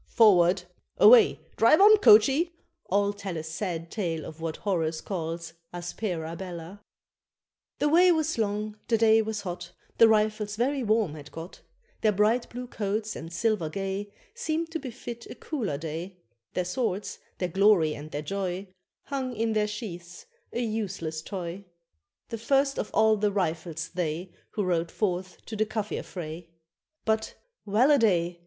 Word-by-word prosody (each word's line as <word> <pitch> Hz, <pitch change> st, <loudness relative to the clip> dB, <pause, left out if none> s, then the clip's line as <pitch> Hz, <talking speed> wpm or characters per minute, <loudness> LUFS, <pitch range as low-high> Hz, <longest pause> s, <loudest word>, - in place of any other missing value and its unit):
"Forward!" 185 Hz, -5 st, +5 dB, 0.3 s
Away! 465 Hz, -4 st, +7 dB, 0.2 s
"Drive 230 Hz, +7 st, +6 dB
on, 425 Hz, +2 st, +8 dB
coachee!" 285 Hz, -, +5 dB, 0.3 s
all 200 Hz, +1 st, +2 dB
tell 200 Hz, -4 st, -5 dB
a 155 Hz, -, -4 dB
Sad 165 Hz, 0 st, -4 dB
tale 170 Hz, -7 st, -2 dB
of 160 Hz, +1 st, -10 dB
what 165 Hz, -1 st, -3 dB
Horace 165 Hz, -5 st, -1 dB
calls 170 Hz, -2 st, -4 dB, 0.2 s
aspera 175 Hz, -2 st, -4 dB
bella. 180 Hz, +2 st, -8 dB, 1.0 s
The 295 Hz, -, +1 dB
way 350 Hz, +4 st, +6 dB
was 315 Hz, -5 st, 0 dB
long, 210 Hz, 0 st, -2 dB
the 230 Hz, -, +3 dB
day 225 Hz, 0 st, +5 dB
was 220 Hz, -1 st, -3 dB
hot, 175 Hz, -2 st, -6 dB, 0.3 s
The 230 Hz, -, +9 dB
Rifles 215 Hz, -1 st, +1 dB
very 265 Hz, +5 st, 0 dB
warm 215 Hz, -7 st, +1 dB
had 145 Hz, -2 st, -10 dB
got; 165 Hz, +3 st, -9 dB, 0.4 s
Their 215 Hz, -1 st, +3 dB
bright 215 Hz, +5 st, +2 dB
blue 250 Hz, +1 st, -6 dB
coats 215 Hz, -2 st, -3 dB
and 165 Hz, -, -7 dB
silver 195 Hz, -3 st, 0 dB
gay 195 Hz, +3 st, -4 dB, 0.2 s
Seemed 330 Hz, -8 st, -2 dB
to 325 Hz, -, -2 dB
befit 235 Hz, -3 st, -8 dB
a -, -, -9 dB
cooler 225 Hz, -, -3 dB
day; 165 Hz, +4 st, -6 dB, 0.4 s
Their 180 Hz, -, 0 dB
swords, 200 Hz, 0 st, -2 dB, 0.2 s
their 180 Hz, -, -2 dB
glory 190 Hz, -4 st, +4 dB
and 150 Hz, +1 st, -8 dB
their 145 Hz, 0 st, -4 dB
joy, 190 Hz, +2 st, -3 dB, 0.3 s
Hung 260 Hz, -3 st, -3 dB
in 225 Hz, 0 st, 0 dB
their 210 Hz, -1 st, +2 dB
sheaths, 180 Hz, -5 st, -7 dB, 0.3 s
a 240 Hz, -, -2 dB
useless 195 Hz, -8 st, -3 dB
toy; 180 Hz, +1 st, -6 dB, 0.7 s
The 230 Hz, -1 st, -5 dB
first 275 Hz, +4 st, +2 dB
of -, -, -2 dB
all 220 Hz, 0 st, +4 dB
the 205 Hz, 0 st, +1 dB
Rifles 165 Hz, -3 st, -2 dB
they 175 Hz, 0 st, -3 dB, 0.2 s
Who 210 Hz, -, -1 dB
rode 170 Hz, -2 st, 0 dB
forth 185 Hz, -1 st, -3 dB
to 220 Hz, -, -6 dB
the 215 Hz, 0 st, +1 dB
Kafir 215 Hz, -1 st, -3 dB
fray. 170 Hz, -1 st, -7 dB, 0.6 s
But, 220 Hz, 0 st, 0 dB, 0.3 s
well 230 Hz, +8 st, +4 dB
a 285 Hz, -, +5 dB
day! 175 Hz, -6 st, +2 dB
200 Hz, 160 wpm, -27 LUFS, 170-225 Hz, 1.0 s, The